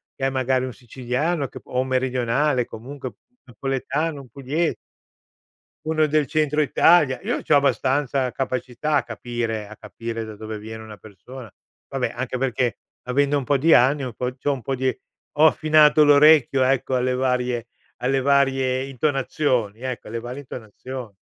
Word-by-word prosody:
che 135 - -2
è - - +1
magari 130 -1 0
un 130 - -6
siciliano 130 +7 -2
che - - -10
p - - -46
o 125 +1 0
meridionale, 130 +1 0
comunque 130 +4 -8 0.3
napoletano, 140 +5 -3
un 130 - -15
puglies 140 +7 -2 1.1
uno 155 0 +2
del 150 -1 +1
Centro 150 +1 +1
Italia, 150 -3 +4
io - - -2
c’ho 150 - +2
abbastanza 135 -2 +1
capacità 130 +3 -2
a - - 0
capire 115 -2 -4
a 110 - -11
capire 115 +1 -6
da 110 -1 -9
dove 110 0 -7
viene 110 +1 -8
una 110 -1 -11
persona, 110 +4 -12 0.4
vabbè, 135 -2 -2
anche 130 +1 -3
perché, 125 -2 -1 0.3
avendo 140 +3 +2
un 135 - -5
po’ 140 +3 +2
di 160 +5 +4
anni, 135 +4 +4
un 125 -2 -5
po’ 125 +3 -3
c’ho 140 +2 -1
un 130 - -6
po’ 135 +4 -2
di 130 0 -1 0.4
ho 155 - +6
affinato 155 -1 +5
l’orecchio, 145 -2 +6
ecco, 130 0 +1
alle 125 0 +1
varie 125 -2 0 0.4
alle 135 +1 +1
varie 135 -1 +2
intonazioni, 130 -5 -1
ecco, 130 -2 -5
alle 115 +2 -4
varie 120 +3 -7
intonazioni. 125 -2 -9
130 Hz, 160 wpm, -23 LUFS, 120-140 Hz, 1.1 s, ho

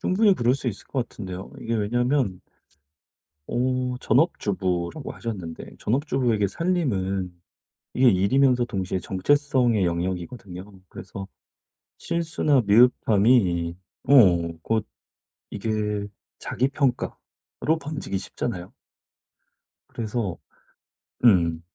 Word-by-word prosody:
충분히 200 +1 +3
그럴 120 -2 +2
수 135 -2 -2
있을 105 - -7
것 125 -3 -2
같은데요. 95 -2 -7
이게 115 0 -2
왜냐하면 120 -1 0 1.1
어 125 0 0
전업주부라고 100 - 0
하셨는데 95 -8 -7
전업주부에게 125 -4 +1
살림은 100 - -1 0.6
이게 130 0 +4
일이면서 125 +6 +3
동시에 95 -5 -3
정체성의 120 +1 +2
영역이거든요. 90 +2 -3 0.2
그래서 95 0 -8 0.7
실수나 155 -5 +1
미흡함이 105 -6 +4 0.3
어 - - +6 0.5
곧 110 +2 0 0.7
이게 105 -1 -2 0.3
자기 130 +3 -1
평가로 140 +3 -2
번지기 140 -9 -4
쉽잖아요. 95 -2 -5 1.2
그래서 110 -4 -3 0.9
음. 85 -7 +4
115 Hz, 245 characters per minute, -24 LUFS, 95-130 Hz, 1.2 s, 어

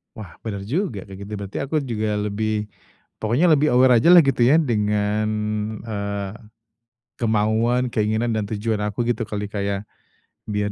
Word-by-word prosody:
Wah, 100 -7 -10
benar 100 -3 -4
juga, 125 - -2
kayak 95 +1 -8
gitu. 105 - -11
Berarti 100 -1 -6
aku 140 +3 -3
juga 110 -5 -2
lebih 105 +1 -2 0.5
pokoknya 120 +11 +2
lebih 150 -3 +4
aware 125 0 +6
ajalah, 170 +9 +7
gitu 135 -5 +2
ya, 150 +6 +5
dengan, 105 -4 0 0.5
eee, 100 -3 -4 0.9
kemauan, 115 +3 +1
keinginan 110 0 0
dan 105 - -1
tujuan 110 +1 -2
aku, 105 +2 -2
gitu 115 -1 -1
kali, 105 -1 -4
Kak, 100 -1 -3
ya? 100 -1 -1 0.7
Biar 105 -1 -1
110 Hz, 150 wpm, -22 LUFS, 105-120 Hz, 0.9 s, ajalah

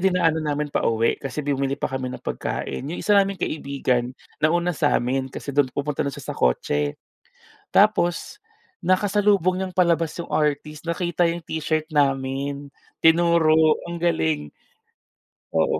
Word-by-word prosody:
dinaanan 180 -4 +2
namin 145 0 -2
pauwi, 115 0 +1
kasi 135 +2 -4
bumili 140 -1 -1
pa - - -2
kami 130 -1 -2
ng - - -9
pagkain. - - -3
'Yong 170 - -4
isa 210 - +3
naming 195 -1 +3
kaibigan, 135 -6 -2 0.2
nauna 175 +3 +2
sa 145 - +2
amin, 130 +2 -1
kasi 140 - -7
do'n 140 -1 +3
pupunta 145 +2 -3
na - - 0
siya 140 - -6
sa - - -10
kotse. 75 +4 0 0.8
Tapos 195 - +2 0.5
nakasalubong 195 -1 +2
niyang 190 0 -3
palabas 170 -3 +2
yung - - -9
artist, 150 0 -1
nakita 175 +1 0
yung 170 0 0
t-shirt 155 0 -2
namin, 140 -1 0 0.3
tinuro. 165 -1 +5 0.3
Ang 170 - -4
galing. 80 - 0 1.0
Oo, 80 - +2
155 Hz, 140 wpm, -23 LUFS, 135-175 Hz, 1.0 s, tinuro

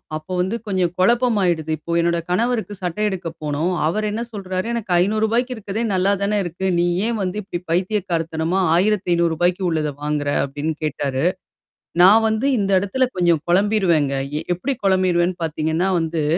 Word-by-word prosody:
அப்ப 155 +2 -7
வந்து 190 +5 0
கொஞ்சம் 185 -3 0
குழப்பமாயிடுது. 185 -7 +2
இப்போ 165 +3 -8
என்னோட 170 0 +1
கணவருக்கு 220 +2 0
சட்டை 180 +4 -2
எடுக்க 190 -4 -4
போனோம். 150 +4 -1 0.2
அவர் 215 +6 -1
என்ன 220 +3 -3
சொல்றாரு 190 0 -4
எனக்கு 220 -6 -4
ரூ.500 220 +6 +1
இருக்கிறதே 215 +1 -4
நல்லா 190 +2 +2
தானே 205 +1 +1
இருக்கு. 175 +2 -5
நீ 175 - +2 0.2
ஏன் 235 -1 -1
வந்து 185 +2 -2
இப்படி 175 -3 -5
பைத்திய 190 +5 +1
கார்த்தனமா 165 +2 -1 0.2
ரூ.1500, 175 -2 +1
உள்ளத 155 -2 -1
வாங்குற 150 -1 -1 0.2
அப்படின்னு 145 +3 -3
கேட்டாரு. 140 -2 -2 0.8
நான் 210 +5 +7
வந்து 220 +4 0
இந்த 195 0 0
இடத்துல 255 +6 0
கொஞ்சம் 170 -4 +3
குழம்பிருவேங்க. 180 -7 +2 0.3
எ - - -5
எப்படி 270 +9 -2
குழம்பிருவேன்னு 185 -2 +2
பார்த்தீங்கன்னா 160 +3 -1
வந்து, 160 -1 -1
180 Hz, 150 wpm, -21 LUFS, 165-210 Hz, 0.8 s, நான்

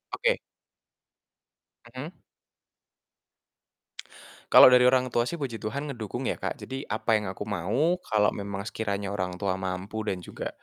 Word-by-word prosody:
Oke. - - +1 1.6
Mhm. - - -7 2.3
Kalau - - +10
dari 125 - +7
orang 130 -1 +1
tua 120 +1 +1
sih, 170 - -4
Puji 130 -7 -5
Tuhan, 140 +7 -4
ngedukung 110 -5 -5
ya, - - +1
Kak, - - -3
jadi 135 +1 -6
apa 110 +2 0
yang 105 -3 +1
aku 100 +2 -6
mau 115 - 0
kalau 105 -8 +2
memang 100 -1 -5
sekiranya 100 -3 -3
orang 90 -2 -3
tua 100 -1 -1
mampu 95 +4 -4
dan 100 -4 -2
juga, - - -5
110 Hz, 140 wpm, -27 LUFS, 100-125 Hz, 2.3 s, Kalau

